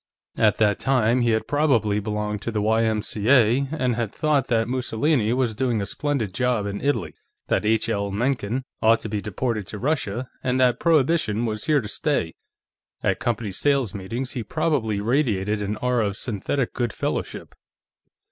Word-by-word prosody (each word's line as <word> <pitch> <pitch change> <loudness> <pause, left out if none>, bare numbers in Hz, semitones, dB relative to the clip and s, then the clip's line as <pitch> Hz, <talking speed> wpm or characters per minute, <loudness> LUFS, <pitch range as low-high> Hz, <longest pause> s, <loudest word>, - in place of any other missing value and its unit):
At - - +4
that 105 -2 +2
time 125 -2 +2
he 120 - +2
had 110 -1 0
probably 125 -9 +2
belonged 105 0 -3
to 115 - -3
the 110 - -1
Y.M.C.A., 110 +3 +2
and 130 -6 0
had 115 -3 -2
thought 150 -4 +1
that 115 -2 +1
Mussolini 125 -1 0
was 125 -2 +1
doing 120 0 0
a 100 - -2
splendid 135 -5 -2
job 125 -1 0
in 100 0 -4
Italy, 115 - -1 0.4
that - - +1
H. 110 0 +2
L. 100 0 -1
Mencken 120 +2 -1 0.2
ought 115 +1 +5
to 110 - -5
be 105 -1 -2
deported 105 0 -3
to 105 - -6
Russia, 130 -2 -1 0.2
and 130 0 0
that 125 -1 +3
Prohibition 150 -8 +2
was 110 -2 -2
here 150 -3 +3
to 105 - -6
stay. 105 - 0 0.7
At - - +1
company 115 -3 -2
sales 135 +1 +1
meetings, 115 +7 -4
he 125 - -4
probably 110 -3 -1
radiated 105 -4 0
an 105 +1 -2
aura 120 -1 0
of 100 0 -4
synthetic 120 +4 -2
good 120 -3 -2
fellowship. - - -4
115 Hz, 170 wpm, -24 LUFS, 105-130 Hz, 0.7 s, ought